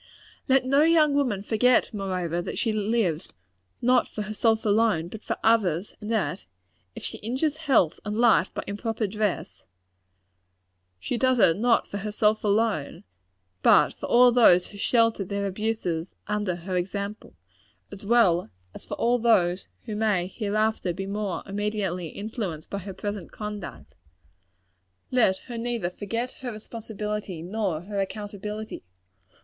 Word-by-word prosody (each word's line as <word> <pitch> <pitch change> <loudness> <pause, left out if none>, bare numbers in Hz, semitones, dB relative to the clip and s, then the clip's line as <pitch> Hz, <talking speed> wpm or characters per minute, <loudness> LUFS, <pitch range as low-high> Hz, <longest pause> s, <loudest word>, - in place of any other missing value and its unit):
Let 265 -1 +4
no 275 +2 +4
young 310 -2 +5
woman 250 -9 0
forget, 240 +3 +3
moreover, 180 -4 -2
that - - -5
she 225 -2 0
lives, 210 -6 0 0.5
not 250 0 +4
for 210 - -5
herself 220 +1 +1
alone, 205 -6 +2
but 220 +3 -9
for - - -3
others; 205 -5 +2
and 210 +2 -5
that 205 - -1 0.5
if - - -8
she - - -4
injures 265 +7 -1
health 270 - +2
and 210 0 -3
life 225 -7 +4
by - - -5
improper 220 +2 -2
dress, 200 -4 -2 1.4
she 235 - -3
does 260 -1 +3
it 165 -7 +5
not 235 +2 +2
for 200 - -5
herself 215 +1 +1
alone, 210 -7 0 0.6
but - - +5
for - - -7
all 245 +1 +6
those 200 -7 +5
who 205 - -12
shelter 230 -2 +2
their 200 +1 -3
abuses 195 -4 -2 0.2
under 210 -4 -1
her 180 +2 -5
example, 200 +4 -4 0.6
as 200 0 -10
well 200 - +3 0.2
as - - -9
for - - -5
all 245 +1 +2
those 190 -6 +2 0.2
who 215 -3 -4
may 210 -5 +1
hereafter 215 -1 -1
be 195 +3 -5
more 200 -1 -3
immediately 200 -3 -2
influenced 200 -4 -5
by 200 - -2
her 195 0 -7
present 205 -3 -5
conduct. 205 - -7 1.2
Let 225 -7 +3
her 240 -2 -6
neither 230 -6 -2
forget 230 +6 -3
her 250 -2 -4
responsibility 210 -4 -5
nor 185 -4 -2
her 200 +2 -4
accountability. 210 +1 -5
210 Hz, 145 wpm, -26 LUFS, 190-230 Hz, 1.4 s, all